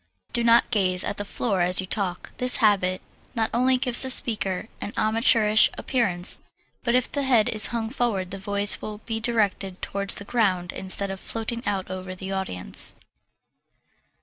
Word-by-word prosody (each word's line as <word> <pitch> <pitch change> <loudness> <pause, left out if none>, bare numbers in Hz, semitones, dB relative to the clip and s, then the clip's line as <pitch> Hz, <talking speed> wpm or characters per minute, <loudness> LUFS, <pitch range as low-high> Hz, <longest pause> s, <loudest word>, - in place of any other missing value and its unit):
Do 235 - +1
not 235 +1 +3
gaze 185 -4 0
at 205 - -5
the 205 - -4
floor 200 -2 -3
as 180 +1 +3
you 190 - -2
talk. 185 -2 -3
This 250 0 +6
habit 195 -5 0 0.3
not 225 -1 -1
only 255 +2 +1
gives 250 -2 +6
the 265 - +5
speaker 215 -6 +3
an 205 - -7
amateurish 220 -1 +2
appearance 185 -8 +2 0.4
but 235 -1 0
if 255 0 0
the 285 - -3
head 250 -6 +1
is 215 -2 +4
hung 230 -2 -4
forward 215 -8 -3
the 195 - -7
voice 200 +1 +3
will 215 -1 -8
be 225 -1 -4
directed 205 -5 -2
towards 200 0 -2
the 200 - -9
ground 190 -7 -2
instead 195 +1 -1
of 195 - -8
floating 230 +3 -6
out 190 -2 -4
over 185 0 -8
the 190 +1 -8
audience. 90 - -2
205 Hz, 175 wpm, -23 LUFS, 190-235 Hz, 0.4 s, This